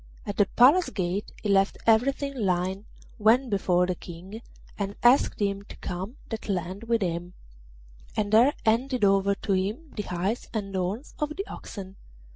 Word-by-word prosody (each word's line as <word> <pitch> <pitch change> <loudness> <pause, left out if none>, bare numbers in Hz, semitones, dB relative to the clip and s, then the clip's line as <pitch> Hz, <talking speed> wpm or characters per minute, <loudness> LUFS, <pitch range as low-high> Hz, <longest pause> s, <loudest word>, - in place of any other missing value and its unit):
At 205 - -5
the 205 - +4
Palace 290 +9 +6
gate 185 +1 -2
he 210 - -1
left 195 0 +3
everything 275 +5 +2
lying, 190 -2 -1 0.3
went 235 +4 +4
before 180 -3 +2
the 185 - -1
King, 180 +5 -10 0.3
and 200 -1 -3
asked 245 +3 +4
him 200 -1 0
to - - -11
come 190 +7 -5
that 220 -2 -6
length 190 +3 -3
with 230 -3 +2
him, 175 0 -3 0.8
and 210 -1 0
there 245 +6 +6
handed 240 +1 +2
over 195 0 +3
to 200 - -2
him 210 +12 -2
the 210 - -2
hides 190 +4 -3
and 195 -2 -3
horns 190 - -3
of 300 0 -2
the 395 +3 -3
oxen. 195 - -9
205 Hz, 165 wpm, -27 LUFS, 190-230 Hz, 0.8 s, Palace